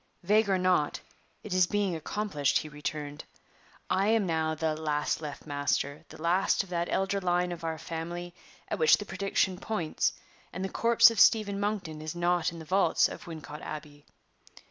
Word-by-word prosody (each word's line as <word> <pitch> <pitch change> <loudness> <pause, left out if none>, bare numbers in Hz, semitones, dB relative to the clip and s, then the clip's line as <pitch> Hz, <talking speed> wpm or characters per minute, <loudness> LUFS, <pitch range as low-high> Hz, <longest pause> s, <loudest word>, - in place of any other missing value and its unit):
"Vague 210 +3 +3
or 190 - +3
not, 180 -5 +1 0.4
it 210 - -5
is 185 -1 +4
being 200 -3 0
accomplished," 160 -4 0
he 155 - -3
returned. 150 0 -5 0.6
"I 195 +2 +1
am 220 -2 +3
now 160 -2 0
the 155 0 -1
'last 150 -1 -1
left 150 -2 -7
master' 145 0 -1
the - - -12
last 175 +5 +2
of 195 - -15
that 170 -1 -1
elder 195 +1 0
line 180 0 +1
of 170 -1 -7
our 160 -1 -2
family 170 +2 -6 0.3
at - - -3
which 470 - +6
the - - -6
prediction 190 -2 0
points; 195 -8 -1 0.4
and 185 - -4
the - - -3
corpse 235 +1 +5
of 225 - -3
Stephen 200 -3 +4
Monkton 200 -7 -3
is 155 +2 -5
not 175 0 +1
in 170 - -9
the 160 - -9
vaults 190 +5 +3
of - - -9
Wincot 150 -3 -8
Abbey. 145 -1 -8
175 Hz, 180 wpm, -29 LUFS, 155-195 Hz, 0.6 s, which